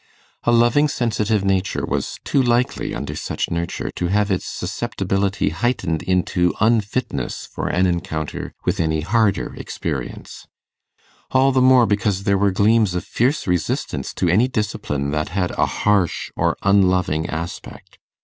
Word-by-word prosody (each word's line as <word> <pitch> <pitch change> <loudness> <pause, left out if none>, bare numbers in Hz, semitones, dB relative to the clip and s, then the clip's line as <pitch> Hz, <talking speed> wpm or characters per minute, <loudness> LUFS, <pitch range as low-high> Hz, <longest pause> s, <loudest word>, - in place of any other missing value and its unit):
A 120 - +4
loving 120 +5 +4
sensitive 110 -6 0
nature 95 -1 0
was - - -3
too 140 - +2
likely, 120 0 0
under - - -5
such - - -3
nurture, 85 0 -3
to 90 - 0
have 105 +2 +1
its 95 - -1
susceptibility 95 -3 -1
heightened 85 -3 -1
into 90 -1 +1
unfitness 110 +2 0
for - - -5
an 90 +1 +2
encounter 80 -3 -3
with - - 0
any 80 -1 +1
harder 105 +4 +1
experience; - - -6 0.8
all 135 +1 +4
the 130 -1 +2
more, 130 -1 +6
because 100 -2 0
there 100 -1 +2
were 100 0 +3
gleams 105 0 +3
of 90 - -2
fierce 130 +6 0
resistance 90 -4 -1
to 90 - 0
any 105 +9 +4
discipline 100 - -2
that 75 0 -1
had 90 0 -1
a - - +1
harsh 100 -5 0
or - - 0
unloving 90 -5 +2
aspect. 85 +1 -7
100 Hz, 145 wpm, -21 LUFS, 90-115 Hz, 0.8 s, more